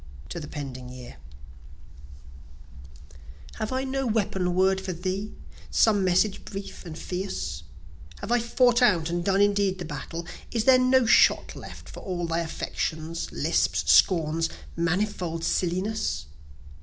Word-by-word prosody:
To - - -5
the 150 - -7
Pending 130 -3 -7
Year 125 - -10 2.4
Have 215 - -3
I 260 +1 -1
no 270 0 -2
weapon 195 -5 0
word 190 +1 +3
for 190 -1 -4
thee 185 +4 -3 0.4
some 210 -3 +3
message 190 +2 +2
brief 195 -2 -8
and 160 -1 -7
fierce? 85 - -4 0.6
(Have - - -6
I 240 - +4
fought 240 +1 +3
out 170 -9 +3
and 175 0 -1
done 195 +1 +2
indeed 200 -2 +2
the 180 - -6
battle?) 165 +2 -6 0.2
Is 230 -2 0
there 255 +1 +6
no 255 0 +4
shot 225 - +4
left, - - -10
For - - -9
all 175 -2 -3
thy 165 0 -1
affectations, 160 0 -3
lisps, 85 - +1
scorns, 165 - +4 0.3
manifold 170 -1 -1
silliness? 185 - -1
185 Hz, 135 wpm, -26 LUFS, 165-210 Hz, 2.4 s, there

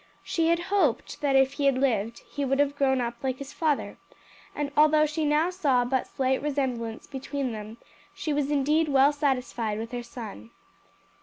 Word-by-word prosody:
She 330 -1 0
had 335 +1 +4 0.2
hoped 305 - +1
that 280 -2 +2
if 270 0 +4
he 285 - -2
had 270 -2 +3
lived 230 -4 0
he 285 - -4
would 270 0 +1
have 285 0 +2
grown 265 -2 +2
up 235 -1 -2
like 260 -1 -2
his 280 +1 -8
father, 310 -4 -1 0.6
and 290 -1 -2
although 305 0 +5
she 305 +1 -2
now 305 +4 +2
saw 275 -9 +2
but 260 +1 0
slight 265 0 0
resemblance 255 -6 -2
between 275 -1 -4
them, 215 +1 -7 0.4
she 305 - -2
was 285 -1 0
indeed 300 +2 +2
well 275 +1 +5
satisfied 250 -7 -1
with 225 +1 -5
her 245 -1 -3
son. 225 - -9
270 Hz, 180 wpm, -27 LUFS, 245-295 Hz, 0.6 s, although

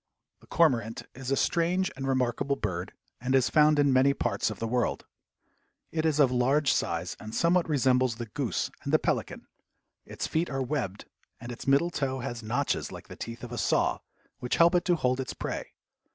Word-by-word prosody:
The - - -21
cormorant 120 -10 +1
is 130 0 -7
a 135 - +2
strange 180 +5 +1
and 135 0 -4
remarkable 135 +1 0
bird, 95 -6 -4 0.3
and 130 +2 0
is 130 -1 +3
found 150 -1 +5
in 145 -2 +4
many 135 +2 +4
parts - - 0
of - - -6
the 115 - -3
world. 120 +1 -1 0.9
It 160 0 0
is 155 -1 +1
of 135 -4 +5
large 135 +3 +2
size 85 +2 -2
and 110 +1 -8
somewhat 170 0 +2
resembles 130 -4 +2
the 120 +1 -5
goose 115 -2 -2
and - - -3
the - - +6
pelican. - - -2 0.6
Its - - -5
feet 165 +2 -1
are 135 -1 -2
webbed, 125 -8 -3 0.3
and 120 - -7
its 120 - -9
middle 140 +6 +3
toe 135 -4 -2
has 120 -2 -5
notches 110 +2 -1
like - - -10
the - - -8
teeth 115 +1 -7
of 120 - -7
a 120 - -4
saw, - - +1 0.4
which 125 - -1
help 170 +2 +5
it 175 - +2
to 175 - +3
hold 130 -4 0
its 130 - -4
prey. - - -5
130 Hz, 195 wpm, -28 LUFS, 120-150 Hz, 0.9 s, the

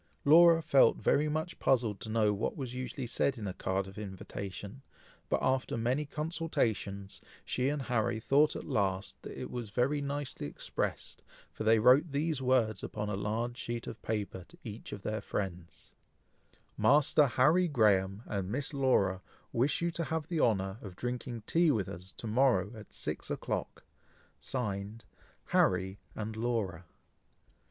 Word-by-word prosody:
Laura 165 +2 +7
felt 140 - +5
very 150 +1 +2
much 160 +3 -3
puzzled 115 -6 +2
to 105 - -7
know 110 -2 +3
what 100 - -2
was 130 -4 -4
usually 125 0 -4
said 130 +3 0
in 110 - -5
a 95 - -3
card 95 +1 -1
of 95 +2 -10
invitation, 100 +3 -7 0.5
but - - +3
after 130 -2 +1
many 125 +6 0
consultations, 125 - -2 0.2
she 130 +2 0
and 145 -1 -2
Harry 120 -2 0
thought 145 +6 +3
at - - -5
last, 95 -1 -1
that - - -8
it - - -6
was 120 -3 -5
very 130 +7 +1
nicely 140 - -4
expressed, - - -4 0.3
for - - -5
they 110 +1 +6
wrote 130 +8 +5
these 145 0 -1
words 125 -4 +2
upon 105 -1 -4
a 105 - -1
large 115 +4 -2
sheet 120 -1 -4
of 115 - -8
paper 105 -4 -3
to - - -17
each 110 -1 -8
of 100 - -7
their 110 0 -2
friends: 90 -5 -5 0.9
Master 145 +1 +5
Harry 155 +9 +4
Graham 105 - +2
and 100 -3 -3
Miss 140 +6 -2
Laura 100 -9 +2 0.3
wish 135 +7 +1
you 170 - +1
to 165 0 -3
have 160 -1 -3
the 170 -3 -1
honour 95 -2 +1
of 95 -4 -9
drinking 120 0 -4
tea 170 +5 +4
with 105 -10 +1
us 90 +2 -8
to - - -10
morrow, 110 -4 +3
at 110 -2 -12
six - - -3
o'clock. - - -3 0.6
(Signed) 105 -3 -3 0.4
Harry 95 +2 +2 0.2
and 110 0 -4
Laura. 110 -7 -2
115 Hz, 160 wpm, -32 LUFS, 100-140 Hz, 0.9 s, Laura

